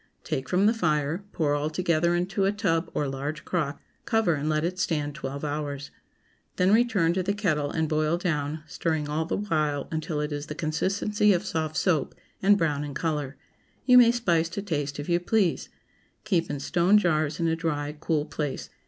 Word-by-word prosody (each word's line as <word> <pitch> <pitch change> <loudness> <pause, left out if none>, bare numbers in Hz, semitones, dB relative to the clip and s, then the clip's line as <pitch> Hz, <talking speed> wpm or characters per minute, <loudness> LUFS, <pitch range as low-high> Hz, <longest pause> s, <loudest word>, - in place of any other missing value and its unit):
Take 130 0 -3
from 185 +2 +3
the 220 - +5
fire, 155 -3 0
pour 150 -3 0
all 145 +1 0
together 170 0 +1
into 185 +3 0
a 195 - +3
tub 185 -5 0
or 145 - 0
large 145 +3 -4
crock; 155 -5 -2 0.3
cover 225 -6 +2
and 150 +1 -2
let 155 0 +1
it 180 +2 -2
stand 150 -5 -1
twelve 140 0 -6
hours. 145 -1 -4 0.6
Then 185 +2 +3
return 215 -8 +3
to 185 - 0
the 200 +3 -1
kettle 155 -8 0
and 160 +1 -1
boil 155 +2 +1
down, 155 -3 -2
stirring 160 -1 -2
all 155 +2 -1
the - - -2
while 155 -8 -1
until 155 -1 -2
it 150 0 -2
is 145 0 -4
the 150 - -6
consistency 195 +6 +1
of 175 - -1
soft 155 -1 -2
soap, 160 -7 +1 0.3
and 200 +1 +5
brown 150 -5 0
in 145 -2 -6
color. 145 -4 -2 0.5
You 250 -1 +8
may 240 -1 +7
spice 175 -9 +1
to 195 +3 -5
taste 145 -7 -3
if 145 - -5
you 175 -1 +2
please. 185 -1 +1 0.5
Keep 185 -6 0
in 145 - -3
stone 175 +7 +3
jars 155 -5 +1
in 165 - +1
a 160 - +2
dry, 150 -3 -2
cool 155 -3 0
place. 150 -3 -4
160 Hz, 195 wpm, -26 LUFS, 150-185 Hz, 0.6 s, You